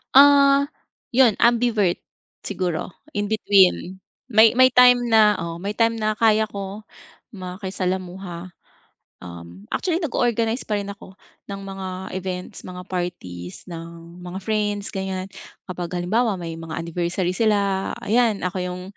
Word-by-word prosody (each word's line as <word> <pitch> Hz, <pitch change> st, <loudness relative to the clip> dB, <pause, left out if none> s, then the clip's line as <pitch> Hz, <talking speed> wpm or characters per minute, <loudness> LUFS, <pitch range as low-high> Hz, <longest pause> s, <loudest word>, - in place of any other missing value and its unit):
Ah, 280 Hz, 0 st, +7 dB, 0.5 s
'yun 240 Hz, -4 st, +5 dB
ambivert 230 Hz, -6 st, +3 dB, 0.4 s
siguro, 175 Hz, -4 st, -3 dB, 0.2 s
in 205 Hz, -7 st, -2 dB
between 190 Hz, -3 st, +3 dB, 0.3 s
may 220 Hz, +1 st, +6 dB
may 255 Hz, +1 st, +6 dB
time 250 Hz, 0 st, +6 dB
na, 215 Hz, -2 st, +6 dB
oh, 170 Hz, 0 st, -5 dB
may 200 Hz, +3 st, -4 dB
time 230 Hz, 0 st, +2 dB
na 215 Hz, 0 st, 0 dB
kaya 220 Hz, 0 st, +3 dB
ko 200 Hz, +1 st, -7 dB, 0.5 s
makisalamuha. 185 Hz, -1 st, -5 dB, 0.7 s
Um, 85 Hz, +2 st, -11 dB
actually 345 Hz, -3 st, 0 dB
nag-o-organize 235 Hz, -, 0 dB
pa 210 Hz, -1 st, -1 dB
rin 200 Hz, -, -6 dB
ako 200 Hz, -1 st, -11 dB, 0.3 s
ng 195 Hz, -, -6 dB
mga 195 Hz, -1 st, -6 dB, 0.3 s
events, 185 Hz, -1 st, -5 dB
mga 180 Hz, 0 st, -8 dB
parties 95 Hz, -, -5 dB
ng 170 Hz, +1 st, -10 dB
mga 180 Hz, +1 st, -6 dB
friends 205 Hz, 0 st, -1 dB
ganiyan, 190 Hz, -1 st, -3 dB, 0.4 s
kapag 175 Hz, -2 st, -5 dB
halimbawa 210 Hz, +3 st, +1 dB
may 165 Hz, -1 st, -5 dB
mga 165 Hz, -1 st, -6 dB
anniversary 175 Hz, +2 st, -2 dB
sila, 200 Hz, -3 st, +1 dB
ayan, 225 Hz, -2 st, +2 dB
ako 180 Hz, +1 st, -3 dB
'yung, 180 Hz, 0 st, -5 dB
195 Hz, 130 wpm, -22 LUFS, 180-220 Hz, 0.7 s, Ah